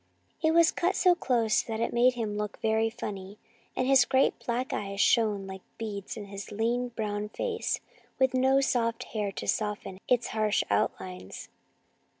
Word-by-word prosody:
It 320 - +3
was 335 -1 +6
cut 365 +2 0
so 365 -1 +5
close 235 -9 +1
that 220 -1 -5
it 230 - -1
made 245 +1 +4
him 220 -3 -3
look 210 0 -4
very 220 0 +2
funny, 200 -3 -7 0.4
and 255 - 0
his 265 -1 +6
great 265 +1 +3
black 245 +2 -2
eyes 200 0 -4
shone 210 -4 +3
like 190 0 -8 0.2
beads 210 -2 -5
in 210 - -6
his 200 +1 -8
lean 235 +4 0
brown 210 -2 -3
face, 455 - -2 0.4
with 260 -1 +3
no 265 +1 +4
soft 235 -2 0
hair 210 -3 -1
to - - -6
soften 210 -3 -2
its 245 -1 +2
harsh 215 -1 +1
outlines. 95 -2 -2
225 Hz, 165 wpm, -28 LUFS, 205-250 Hz, 0.4 s, was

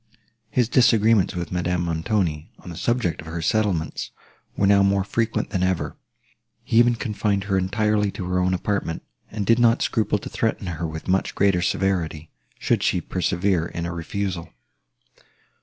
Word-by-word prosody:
His 125 -2 +1
disagreements 115 -5 +4
with 85 -3 -4
Madame 90 -1 -1
Montoni, 85 -2 -1
on 90 - -10
the - - -8
subject 120 -5 -1
of 80 - -12
her 85 +1 -4
settlements, 95 -6 0 0.5
were 100 - +2
now 100 0 +5
more 100 0 +3
frequent 115 +3 -1
than 95 - -1
ever; 95 -2 -1 0.7
he 115 - 0
even 120 0 +5
confined 105 -4 -1
her 100 -1 -1
entirely 105 +2 +1
to 90 - -5
her 90 0 0
own 90 0 +1
apartment, 95 -3 -2 0.3
and 105 -1 -3
did 115 +3 +4
not 120 -1 +4
scruple 110 -2 +1
to - - -8
threaten 110 -3 -1
her 85 -2 -3
with 80 0 -7
much 95 +1 0
greater 100 -3 +3
severity, 85 -5 -1 0.3
should - - 0
she - - +1
persevere 90 -1 0
in 85 0 -5
a 85 - -4
refusal. 85 +1 -4
95 Hz, 165 wpm, -23 LUFS, 85-105 Hz, 0.7 s, now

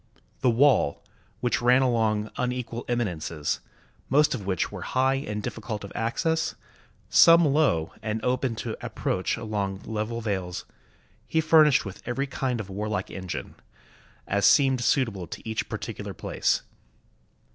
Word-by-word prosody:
The 130 - +3
wall, 120 - +3 0.4
which 120 - +1
ran 125 +2 +5
along 110 -4 +1
unequal 125 -1 -3
eminences, 85 -10 -2 0.5
most 150 +3 +4
of 105 -7 -5
which 95 -4 0
were - - -7
high 130 +1 +1
and 105 -6 -3
difficult 110 -1 -5
of 100 - -8
access, 160 +8 0 0.5
some 170 0 +7
low 135 - +2
and 110 0 -2
open 125 -1 0
to - - -3
ap - - -6
proach 95 - -1
along 100 -3 -3
level 110 +1 -3
vales, 95 -5 -3 0.6
he 160 - +1
furnished 155 -4 +5
with 95 -1 -8
every 135 +3 -1
kind 130 -3 -2
of 110 - -5
warlike 100 0 -3
engine, 95 -2 -5 0.7
as 100 0 +2
seemed 135 -3 +4
suitable 110 - +1
to - - -9
each 110 0 -2
particular - - -5
place. - - 0
115 Hz, 140 wpm, -26 LUFS, 100-130 Hz, 0.7 s, some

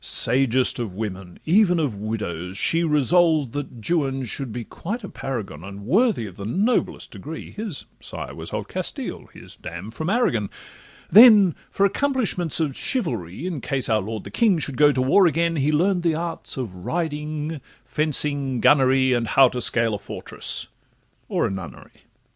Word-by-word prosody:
Sagest 130 +1 +4
of 110 -6 -4
women, 95 -4 -6
even 180 +1 +4
of 145 -7 0
widows, 100 -4 -5
she 165 +10 +2
Resolved 155 -2 +3
that 125 -5 -6
Juan 135 -6 0
should 130 +1 -4
be 120 +1 -5
quite 210 - -6
a 200 - -6
paragon, 100 - -6
And 100 +1 -9
worthy 205 - +2
of 95 -3 -10
the 100 - -6
noblest 210 - 0
pedigree 145 +11 -8
(His 210 -8 -6
sire - - -7
was - - -8
of - - -4
Castile, - - -4
his - - -12
dam 90 +6 -8
from 160 +8 -4
Aragon): 120 - +1 0.6
Then 210 -4 +8 0.2
for 200 - +1
accomplishments 205 - 0
of 150 -5 -1
chivalry, 155 - -2
In 170 -7 -4
case 135 -3 0
our 110 -1 +2
lord 110 +2 -5
the - - -10
king 220 -7 +3
should 140 -4 -3
go 150 +2 +5
to 130 -2 0
war 180 +8 +5
again, 165 +1 0
He 145 +2 +1
learn'd 180 +4 +2
the 165 -2 +1
arts 165 -2 -3
of 120 -8 -4
riding, 155 - -3 0.2
fencing, 140 -1 0
gunnery, 130 -1 +4
And 120 -2 0
how 135 +1 +5
to 125 - -4
scale 115 -1 +1
a 105 - -3
fortress—or 100 - -5
a - - -1
nunnery. 95 -3 -9
140 Hz, 165 wpm, -23 LUFS, 115-170 Hz, 0.6 s, Then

